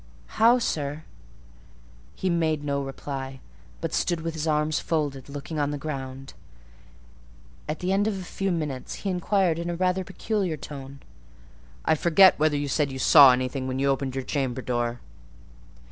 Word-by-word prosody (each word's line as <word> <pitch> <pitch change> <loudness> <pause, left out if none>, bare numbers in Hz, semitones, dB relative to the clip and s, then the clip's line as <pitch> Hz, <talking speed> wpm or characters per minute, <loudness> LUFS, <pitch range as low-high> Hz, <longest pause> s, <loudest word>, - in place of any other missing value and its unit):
"How, 235 +2 +7
sir?" 150 - -2 1.1
He 190 - -3
made 160 -4 +1
no 140 -1 -1
reply, 135 -1 -6 0.4
but - - -3
stood 170 -2 0
with 165 0 -3
his 160 0 -3
arms 150 0 +1
folded, 145 -5 -2
looking 145 +2 -5
on 145 -1 +1
the 145 - -3
ground. 135 -2 -6 1.4
At 155 - -3
the 180 +1 0
end 205 +2 +2
of 210 -3 -1
a 190 - -6
few 195 +2 -2
minutes 150 -6 -3
he 195 - +1
inquired 180 -2 +1
in 170 0 -3
rather 185 +1 +1
a - - -4
peculiar 190 -3 -2
tone— 140 -1 -9 0.8
"I 160 - +4
forget 170 +4 +5
whether 155 -1 +2
you 145 0 -2
said 140 0 0
you 130 - -5
saw 135 +1 +8
anything 130 +1 -1
when 130 0 -2
you 140 +1 +1
opened 135 -1 -1
your 135 - -2
chamber 130 -2 -2
door." 120 -1 -2
150 Hz, 165 wpm, -26 LUFS, 135-170 Hz, 1.4 s, saw